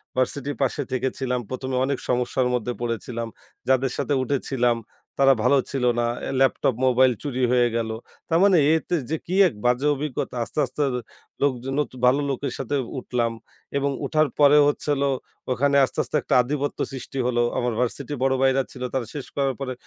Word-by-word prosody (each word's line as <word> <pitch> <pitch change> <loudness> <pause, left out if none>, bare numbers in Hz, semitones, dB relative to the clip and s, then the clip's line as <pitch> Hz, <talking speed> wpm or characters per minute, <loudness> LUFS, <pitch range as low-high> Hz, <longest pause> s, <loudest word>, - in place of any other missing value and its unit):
ভার্সিটির 140 +2 -1
পাশে 135 +2 0
থেকে 130 +1 0
ছিলাম। 125 -2 -1
১ম 130 0 -4
এ - - +1
অনেক 140 -1 -1
সমস্যার 125 +1 +1
মধ্যে 120 0 -1
পড়েছিলাম। 115 0 -3 0.4
যাদের 130 -1 +2
সাথে 145 - 0
উঠেছিলাম 125 -3 0 0.4
তারা 135 0 +6
ভালো 140 +3 +4
ছিল 135 -2 -2 0.2
না। 120 - +2 0.3
ল্যাপটপ 135 -2 +2
মোবাইল 130 0 +5
চুরি 130 -3 -2
হয়ে 120 -1 +4
গেল। 115 -1 -1 0.4
তার 165 +1 +3
মানে 195 -3 +5 0.2
এতে 160 +2 0
যে, 160 - 0
কি 185 - -2
এক - - -4
বাজে 125 +4 +2
অভিজ্ঞতা 140 -3 -4
আস্তে, 150 - -5
আস্তে 130 +4 -5 0.6
লোকজন 135 -1 0 0.3
ভালো 135 +3 +4
লোকের 140 +1 -2
সাথে 135 +2 -2 0.2
উঠলাম 120 -2 -1 0.5
এবং 140 0 +1 0.2
উঠার 155 +2 +2
পরে 145 0 +7
হচ্ছিল 145 -1 0 0.5
ওখানে 140 +2 +2
আস্তে, - - -6
আস্তে - - -5
একটা - - 0
আধিপত্য 145 +3 -3
সৃষ্টি 135 0 -6
হলো। 120 -1 +1 0.2
আমার 120 -1 0
ভার্সিটি 130 +3 -2
বড় 135 0 +3
ভাইরা 135 0 +4
ছিল 125 -1 -8
তারা 130 -3 -1
শেষ 145 -3 -5
করার 135 -2 0
পরে 130 -2 -3
130 Hz, 170 wpm, -24 LUFS, 125-140 Hz, 0.6 s, পরে